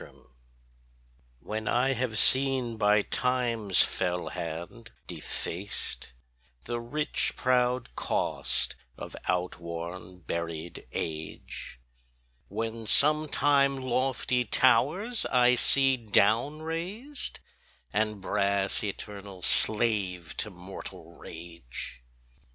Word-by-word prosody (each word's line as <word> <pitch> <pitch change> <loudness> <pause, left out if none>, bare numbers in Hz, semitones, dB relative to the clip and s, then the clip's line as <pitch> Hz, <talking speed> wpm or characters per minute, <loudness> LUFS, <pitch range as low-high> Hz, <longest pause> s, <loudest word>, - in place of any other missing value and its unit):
64 - - -14 1.2
When 110 0 -5
I 130 +2 +2
have 120 -3 -2
seen 130 -1 +4
by 105 -1 +3
Time's 120 -7 +2
fell 90 -1 -1
hand 85 +9 -6 0.2
defaced 95 -7 -4 0.5
The 120 0 -3
rich 145 +6 -1
proud 125 -1 +1
cost - - 0 0.2
of - - -8
outworn 90 0 -4
buried 85 0 -5
age, 80 -5 -6 0.7
When 115 +2 -4
sometime 145 -1 +5
lofty 130 -1 0
towers 170 - +2
I 125 -1 +4
see 135 +1 +4
down 115 +7 +2
rased, 195 - -5 0.5
And 105 -1 0
brass 100 0 0
eternal 100 -2 -6
slave 100 -7 +2
to - - +1
mortal 95 0 -10
rage. 80 -8 -9
110 Hz, 90 wpm, -28 LUFS, 90-130 Hz, 1.2 s, sometime